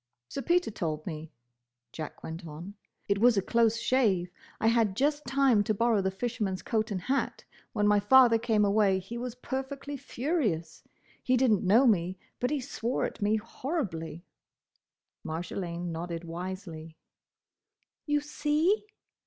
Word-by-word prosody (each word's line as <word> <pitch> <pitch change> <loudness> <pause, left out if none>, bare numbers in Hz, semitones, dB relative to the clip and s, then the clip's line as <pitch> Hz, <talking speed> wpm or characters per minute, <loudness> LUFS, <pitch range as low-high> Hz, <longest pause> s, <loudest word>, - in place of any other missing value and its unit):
"Sir 275 - -4
Peter 350 -3 +2
told 155 -6 -3
me," 160 -2 -6 0.6
Jack 155 -1 -7
went 165 +2 -6
on. 165 +6 -8 0.3
"It 200 0 +1
was 235 0 +5
a - - +4
close 230 0 +3
shave. 210 -8 +2 0.3
I - - -1
had 225 -4 +3
just 290 +3 0
time 265 -5 +4
to 215 - +1
borrow 230 -1 +2
the 190 - +1
fisherman's 200 -2 -3
coat 220 0 0
and 195 -3 -2
hat. 270 +8 -1 0.3
When 210 -2 +2
my 205 0 +5
father 235 +2 +6
came 220 -3 +2
away 200 -1 +3
he 195 +6 -6
was 245 -1 -5
perfectly 270 +3 -5
furious. 235 - -2 0.4
He 255 0 +2
did 255 -2 +3
n't 210 - +2
know 220 +8 +5
me, 185 -5 +2 0.2
but 250 - 0
he 295 0 0
swore 245 -1 -2
at - - -6
me 205 +2 +3
horribly." 200 - -4 1.0
Marjolaine 175 +1 -4
nodded 165 +1 -4
wisely. 170 -2 -7 1.1
"You 295 0 +2
see! 300 +7 +1
215 Hz, 150 wpm, -29 LUFS, 180-255 Hz, 1.1 s, father